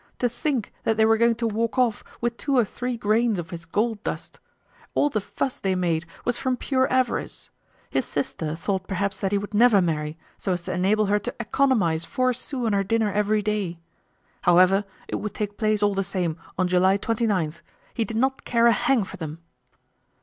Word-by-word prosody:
To 245 - +2
think 240 -1 -2
that 225 - +1
they 220 - +5
were 225 0 +4
going 235 0 +4
to 230 0 -1
walk 225 +3 -1
off 240 -4 +2 0.2
with 240 0 0
two 275 +2 0
or 240 - +5
three 245 +4 -4
grains 220 0 +2
of 170 -2 -5
his 170 -1 -7
gold 215 +5 -1
dust! - - -5 0.6
All 290 - +3
the 215 - 0
fuss 255 +6 -3
they 190 -1 0
made 170 -2 0 0.2
was 245 0 0
from 255 -1 0
pure 260 +1 +1
avarice. 255 -1 -1 0.4
His - - -1
sister 155 -1 -2
thought 190 +2 -2
perhaps 195 0 -2
that 195 - -1
he 205 - +2
would 205 +1 -5
never 220 -1 +6
marry, 155 -3 -1 0.2
so 190 - 0
as 175 -1 -3
to 185 - -3
enable 200 +4 +2
her 205 +1 +2
to - - -5
economize 215 -9 +2
four 255 +7 +1
sous 250 0 -3
on 220 - +1
her 200 0 +2
dinner 220 +1 +1
every 210 0 +1
day. 205 -5 -1 0.6
However, 185 +3 +5 0.2
it - - -2
would 210 -1 -5
take 205 -2 -3
place 215 -1 +1
all 205 -1 +3
the 195 - 0
same 180 -4 -1 0.2
on 185 - +2
July 185 +2 +4
29. 205 -8 0 0.4
He 230 - 0
did 220 +1 -4
not 265 +3 +1
care 235 -1 +2
a 235 - +7
hang 230 +1 +2
for - - -9
them! 160 -2 -6
210 Hz, 205 wpm, -25 LUFS, 185-235 Hz, 0.6 s, a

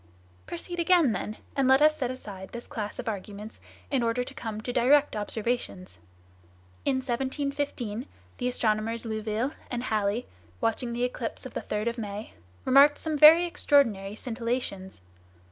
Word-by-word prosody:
"Proceed 345 - -5
again, 340 -6 +4
then; 215 0 -4 0.2
and 275 -2 +2
let 265 +1 +6
us 305 +1 +5
set 255 -4 -2
aside 200 -7 -7
this 235 0 -6
class 210 -2 -5
of 250 - -6
arguments 210 +1 -6 0.3
in 270 -3 +2
order 235 +1 +1
to - - -8
come 220 -2 -5
to 245 +2 -4
direct 285 +3 +4
observations. 210 - -3 0.9
In 275 - +2
1715 260 -2 -2 0.3
the 245 - 0
astronomers 225 -1 0
Louville 220 +3 -2 0.2
and 240 -1 -3
Halley, 215 0 0 0.3
watching 235 +1 0
the 240 +1 -1
eclipse 245 -1 -3
of 260 - -8
the - - -3
3rd 210 +2 -2
of 235 +1 -1
May, 210 0 -6 0.3
remarked 280 +3 +6
some 315 -1 -2
very 310 +4 +9
extraordinary 230 - +2
scintillations. 230 - -4
235 Hz, 150 wpm, -28 LUFS, 215-265 Hz, 0.9 s, very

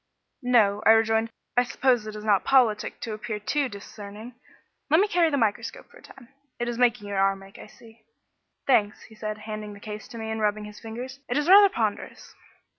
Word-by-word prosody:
"No," 220 -5 +3
I 220 - +7
rejoined, 225 0 +2 0.3
"I 245 - +4
suppose 245 -3 +1
it 215 - -7
is 210 0 -8
not 205 -3 +3
politic 245 -6 +2
to 225 - -4
appear 215 0 -5
too 275 +6 -1
discerning. 205 +2 -10 0.6
Let 315 +3 +5
me 410 - +3
carry 345 -4 +3
the 285 - 0
microscope 225 - -2
for - - -16
a - - -18
time; 265 -3 -16 0.3
it 240 - -3
is 240 0 -3
making 240 -4 +2
your 200 -1 -2
arm 195 0 +1
ache, 195 0 -15
I - - -11
see." 225 +1 -18 0.6
"Thanks," 215 -6 +2
said 215 -1 -5
he, 215 - -14
handing 215 -1 -6
the 200 - -12
case 210 +1 -8
to 235 - -10
me 220 0 -5
and 220 0 -3
rubbing 210 0 0
his 210 0 -11
fingers; 245 +4 -8
"it 245 - 0
is 295 +1 0
rather 400 +2 +8
ponderous." 395 - -4
225 Hz, 210 wpm, -26 LUFS, 210-250 Hz, 0.6 s, rather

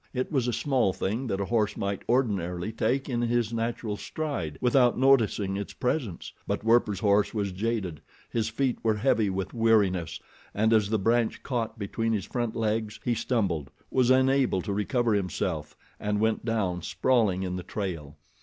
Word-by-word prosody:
It 130 - -2
was 130 -5 +1
a - - +1
small 125 -5 +1
thing 110 +9 -2
that 95 -3 -2
a 100 - -1
horse 105 -1 0
might 100 -1 -2
ordinarily 100 -7 0
take 125 +5 0
in 120 -3 -1
his 120 -1 0
natural 115 -2 -2
stride 100 - -4
without 125 -1 +3
noticing 115 -7 +3
its 100 - -5
presence; 125 - -2
but - - -2
Werper's 110 -4 +3
horse 100 +1 +2
was 100 -2 -1
jaded, 95 -5 -2 0.3
his 115 -2 -1
feet 125 +3 -1
were 110 -1 +2
heavy 110 -2 +2
with 95 0 -3
weariness, 105 -7 +2 0.4
and 110 +2 +3
as 105 -2 +3
the 110 - +2
branch 115 +3 +1
caught 120 -3 -2
between 115 +2 -1
his 100 -4 -1
front 120 -3 -3
legs 110 -1 -1
he 120 - +2
stumbled, 95 - -1 0.2
was 130 -2 +3
unable 130 -6 +3
to 100 - -2
recover 110 +3 +1
himself, 95 -4 -2 0.2
and 105 0 -1
went 110 0 +1
down, 100 -6 -1
sprawling 95 +1 +1
in 90 -1 -3
the 90 - -4
trail. 85 -7 -5
110 Hz, 175 wpm, -27 LUFS, 100-120 Hz, 0.4 s, without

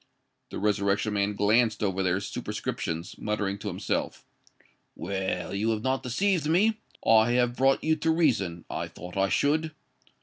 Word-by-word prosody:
The - - -6
Resurrection 105 +1 +1
Man 100 0 0
glanced 110 +2 +2
over 95 -1 0
their 90 0 +1
superscriptions, 85 -3 -4
muttering 105 -2 -2
to 105 - -6
himself, 95 0 -3 0.7
"Well, 95 -1 -3
you 105 +3 0
have 110 -1 -1
not 130 0 0
deceived 155 +5 0
me: 215 +6 +3 0.3
I 110 +1 +5
have 120 0 +2
brought 135 +2 +2
you 160 0 +3
to 160 +2 -1
reason—I 115 - 0
thought 90 +1 -10
I 95 0 +2
should. 155 +5 +1
110 Hz, 145 wpm, -27 LUFS, 100-135 Hz, 0.7 s, I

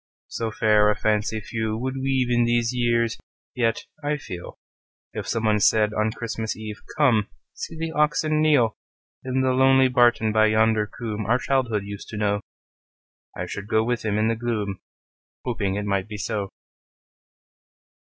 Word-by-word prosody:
So 115 -1 -3
fair 105 -1 +3
a 105 - +2
fancy 110 +1 0
few 110 0 -3
would 130 +3 -3
weave 130 -2 0
In 120 0 +3
these 120 0 +1
years! 115 -2 +1 0.3
Yet, 115 -2 0 0.2
I 150 +1 0
feel, 90 -11 -8 0.6
If - - -5
someone 110 -2 +1
said 105 +1 +3
on 110 0 +1
Christmas 110 -1 -4
Eve, 110 -1 -7 0.2
"Come; 120 -9 +3 0.3
see 160 - -7
the 165 0 -3
oxen 155 0 +1
kneel,"In 130 -1 0
the 130 0 +2
lonely 130 0 +5
barton 120 -3 +3
by 110 0 +4
yonder 110 0 +3
coomb 110 -2 -5
Our 120 +2 +4
childhood 125 -6 0
used 100 0 -8
to 110 - -6
know,"I 105 -1 -6
should 100 0 -6
go 110 0 +2
with 120 +1 -1
him 105 -1 0
in 110 +1 +2
the 115 - +1
gloom, 110 -5 -3 0.7
Hoping 105 -6 -1
it 105 0 -2
might 100 -1 -1
be 105 -1 -6
so. 105 -2 -3
110 Hz, 155 wpm, -24 LUFS, 105-125 Hz, 0.7 s, lonely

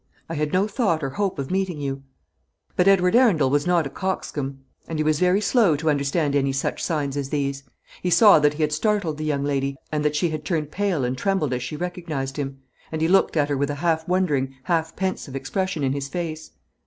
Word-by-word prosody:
I 165 - -5
had 150 -1 -1
no 190 +3 +2
thought 195 - 0
or 135 - -2
hope 195 +4 -1
of 135 +2 -4
meeting 190 -4 -1
you." 135 -1 -3 0.7
But 180 - +3
Edward 190 0 +4
Arundel 180 - +4
was 145 +3 +1
not 175 -3 +3
a - - -3
coxcomb, 145 -8 -3 0.3
and 165 - -4
he 155 - +1
was 155 -1 +1
very 180 +2 +3
slow 205 - +3
to 155 +2 +1
understand 145 +1 0
any 135 -1 +1
such 135 - -2
signs 145 -5 -1
as 140 -2 -3
these. 140 -1 -1 0.4
He 180 - -1
saw 205 0 +7
that 150 0 +2
he 155 - -1
had 150 0 0
startled 175 -3 0
the 155 - -3
young 145 -2 0
lady, 140 -1 -1 0.2
and 150 -1 -1
that 150 0 +1
she 165 +3 +1
had 155 -1 -4
turned 155 -2 -2
pale 185 -9 0
and 125 +1 -1
trembled 155 -2 0
as 125 - -2
she 125 +5 -5
recognised 160 -6 -4
him; 135 -2 -4 0.3
and 160 - -3
he 160 - +2
looked 185 -2 +3
at 145 -1 +2
her 145 - 0
with 140 +1 0
a 145 - -2
half 160 +1 0
wondering, 150 -8 0
half 160 -1 -1
pensive 185 -7 -3
expression 160 +4 -2
in 135 -1 +1
his 140 -1 -3
face. 160 0 -5
155 Hz, 230 wpm, -23 LUFS, 140-180 Hz, 0.7 s, saw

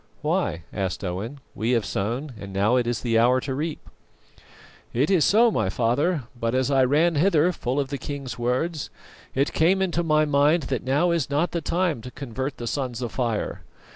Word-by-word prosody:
"Why?" 85 - 0
asked 95 -2 -3
Owen. 100 +10 -4
"We 115 +3 0
have 115 -4 +1
sown, 120 +8 -3
and 100 -1 -8
now 100 +5 +2
is 120 -2 0
the 115 -2 +2
hour 125 +2 +4
to 135 - -3
reap." 155 +3 -4 1.1
"Quite 155 +9 +2
so, 225 +9 +5
my 95 - 0
father, 130 - +1
but 115 0 -1
as 130 +2 +1
I 135 -1 +4
ran 155 +6 +3
hither, 165 +1 +3
full 130 -5 -2
of 140 -2 -1
the 140 -2 -4
king's 135 -4 -6
words, 130 +6 -1 0.5
it 140 +2 +1
came 180 +4 +3
into 175 -3 0
my 155 -2 +3
mind 150 +3 +3
that 125 - -1
now 145 +8 +2
is 165 -6 0
not 150 +5 +1
the 170 - -2
time 170 -5 0
to 125 - -8
convert 130 +1 -5
the 120 - -6
Sons 125 -1 -3
of 120 - -3
Fire. 115 -4 -2
135 Hz, 190 wpm, -24 LUFS, 120-155 Hz, 1.1 s, so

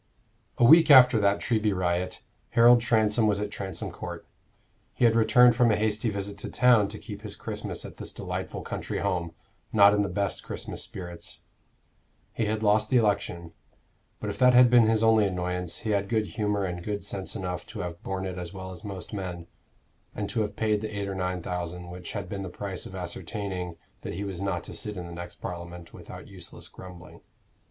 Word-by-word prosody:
A - - +2
week 160 +5 +8
after 125 -4 +8
that 100 0 +3
Treby 110 -4 +1
riot, 90 0 -1 0.3
Harold 120 +1 +7
Transome 110 -2 +3
was 100 -1 +2
at 105 0 -3
Transome 95 -4 -4
Court. - - -7 0.7
He 125 - +3
had 115 -1 +4
returned 120 +1 +6
from 120 -1 +4
a 105 - +4
hasty 105 +1 0
visit 100 0 -4
to - - -5
town 120 -5 +4
to - - -6
keep - - -9
his - - -7
Christmas - - -5
at - - -10
this - - -2
delightful - - -5
country - - -4
home, 85 -2 -1 0.4
not 100 -1 +7
in 105 - +2
the 100 - -1
best 100 +2 -2
Christmas - - -5
spirits. 85 -2 -7 0.9
He 115 - -1
had 110 +1 -1
lost 105 0 +3
the 130 - +4
election; 90 -6 0 0.7
but - - -3
if - - -8
that 125 -1 +6
had 125 -1 +7
been 120 -2 +6
his 110 0 +2
only 110 -2 +5
annoyance, 90 -1 -2
he 110 - -2
had 100 -1 0
good 110 -3 0
humor 105 -2 -1
and 90 -1 -4
good 105 +1 -3
sense 95 +1 -4
enough 90 -4 -4
to - - -6
have 85 0 -6
borne 95 0 -3
it 90 -1 -4
as 85 -1 -6
well 95 -1 -7
as 90 -2 -8
most 95 -3 -7
men, 90 -4 -5 0.7
and 105 -1 -3
to 115 - 0
have 105 -1 -3
paid 105 -1 +1
the 110 -1 -5
eight 100 - -2
or 100 - -3
nine 90 -2 -2
thousand, 90 0 -5
which 90 0 -7
had 100 -3 -4
been 100 +2 -5
the 95 - -5
price 95 0 -6
of 95 - -10
ascertaining 90 -1 -4 0.3
that - - -5
he 100 - -3
was 95 -3 -5
not 95 -4 -2
to - - -7
sit 105 -2 -4
in 90 - -5
the 85 - -8
next 85 0 -7
Parliament, 85 -1 -8
without - - -10
useless - - -10
grumbling. 90 -1 -12
100 Hz, 205 wpm, -27 LUFS, 90-110 Hz, 0.9 s, week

